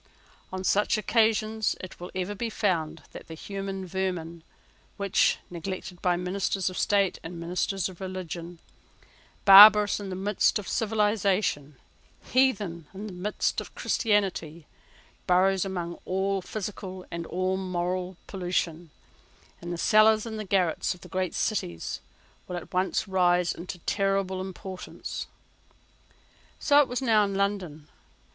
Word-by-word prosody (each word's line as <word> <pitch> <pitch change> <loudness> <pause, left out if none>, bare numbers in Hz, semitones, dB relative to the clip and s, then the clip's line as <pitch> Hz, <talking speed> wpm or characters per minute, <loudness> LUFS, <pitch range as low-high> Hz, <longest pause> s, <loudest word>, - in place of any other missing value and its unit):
On 185 0 -4
such 205 +3 +2
occasions 220 0 +1
it 185 - -9
will 175 +1 -7
ever 185 +2 -2
be 230 +3 -3
found 165 -7 -1
that - - -10
the 160 - -8
human 195 +2 -5
vermin 175 -3 -3 0.6
which, 200 -1 +2
neglected 180 +1 -6
by 180 -1 +2
ministers 185 +1 -1
of 185 - -8
state 200 -2 +2
and 170 +1 -8
ministers 180 +2 -1
of 185 -1 -12
religion, 175 -2 -6 0.9
barbarous 205 +1 +9
in 200 -1 -6
the 185 - -4
midst 200 +4 +1
of 210 - -7
civilisation, 205 -9 0 0.6
heathen 205 - +1
in 200 +3 -6
the 205 - -7
midst 185 +4 -1
of - - -12
Christianity, 185 -7 0 0.6
burrows 190 +1 +3
among 175 -3 -4
all 190 +1 0
physical 190 -1 -6
and 170 -1 -5
all 185 +1 -1
moral 185 -1 -2
pollution, 175 -3 -2 0.7
in 175 - -7
the 175 - -3
cellars 215 +3 +5
and 215 -3 -6
garrets 180 -3 +1
of 180 - -19
great 185 -2 -2
cities, 85 - -2 0.5
will 180 - -4
at 175 - -9
once 185 +3 0
rise 180 -2 +2
into 180 +1 -7
a - - -25
terrible 195 -1 0
importance. 190 0 -7 1.3
So 290 -1 +4
it 285 - +1
was 250 +2 -3
now 220 -4 +4
in 200 -1 -2
London. 190 -7 -2
190 Hz, 135 wpm, -27 LUFS, 175-205 Hz, 1.3 s, barbarous